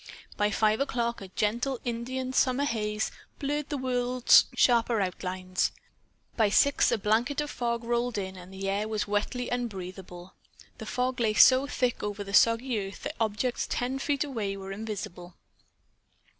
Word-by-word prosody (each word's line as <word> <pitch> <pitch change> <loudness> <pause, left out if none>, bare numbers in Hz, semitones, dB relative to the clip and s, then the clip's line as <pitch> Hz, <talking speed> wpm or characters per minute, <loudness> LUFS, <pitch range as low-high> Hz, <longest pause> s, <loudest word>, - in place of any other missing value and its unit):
By 210 0 +1
five 215 +1 +2
o'clock 235 -4 -1
a 195 - -7
gentle 235 +7 -1
India 255 +2 -3
summer 260 +1 +2
haze 215 -5 -1 0.3
blurred 295 +1 -2
the 290 - -2
world's 250 -1 +4
sharper 235 -2 +3
outlines. 185 -1 -2 0.6
By 220 -3 +3
six 280 +7 +4
a - - +2
blanket 235 +8 0
fog 235 -4 -2
rolled 240 0 -1
in, 190 -1 -4
and 180 0 -11
the 190 0 -5
air 200 +2 0
was 215 -1 -2
wetly 215 +4 -1
unbreatheable. 190 -6 -5 0.5
The 220 - -7
fog 250 +2 -1
lay 220 -2 +1
so 260 +4 +7
thick 250 -4 -1
over 205 0 -3
the 200 0 -9
soggy 230 +2 +4
earth 195 0 -7
that - - -4
objects 225 +3 -1
ten 255 +2 -2
feet 285 0 0
away 220 -9 -3
were 195 0 -7
invisible. 195 -4 -6
230 Hz, 155 wpm, -28 LUFS, 200-250 Hz, 0.6 s, so